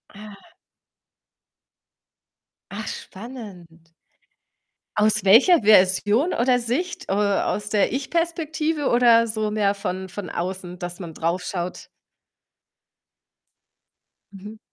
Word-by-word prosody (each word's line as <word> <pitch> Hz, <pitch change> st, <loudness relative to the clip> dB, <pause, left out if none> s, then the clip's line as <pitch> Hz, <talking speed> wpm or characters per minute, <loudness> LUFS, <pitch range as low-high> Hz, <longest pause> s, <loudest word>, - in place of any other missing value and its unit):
Ah. 210 Hz, +1 st, -11 dB, 2.4 s
Ach, -, -, -6 dB
spannend. 185 Hz, -8 st, -10 dB, 1.0 s
Aus 215 Hz, 0 st, +2 dB
welcher 240 Hz, -, +6 dB
Version 210 Hz, -, +3 dB
oder 245 Hz, +1 st, +2 dB
Sicht, 255 Hz, +10 st, -3 dB
äh, -, -, +1 dB
aus 205 Hz, 0 st, 0 dB
der 210 Hz, -2 st, +1 dB
Ich-Perspektive, 315 Hz, +1 st, -2 dB
oder 235 Hz, -1 st, +4 dB
so 215 Hz, -1 st, -2 dB
mehr 205 Hz, -2 st, +1 dB
von 190 Hz, -2 st, -5 dB
von 190 Hz, 0 st, -7 dB
außen, 180 Hz, 0 st, -5 dB
dass 175 Hz, +1 st, -6 dB
man 170 Hz, -3 st, -8 dB
drauf 170 Hz, +3 st, -2 dB
schaut? 180 Hz, -1 st, -5 dB, 2.5 s
Mhm. 205 Hz, +3 st, -11 dB
210 Hz, 95 wpm, -23 LUFS, 185-245 Hz, 2.5 s, welcher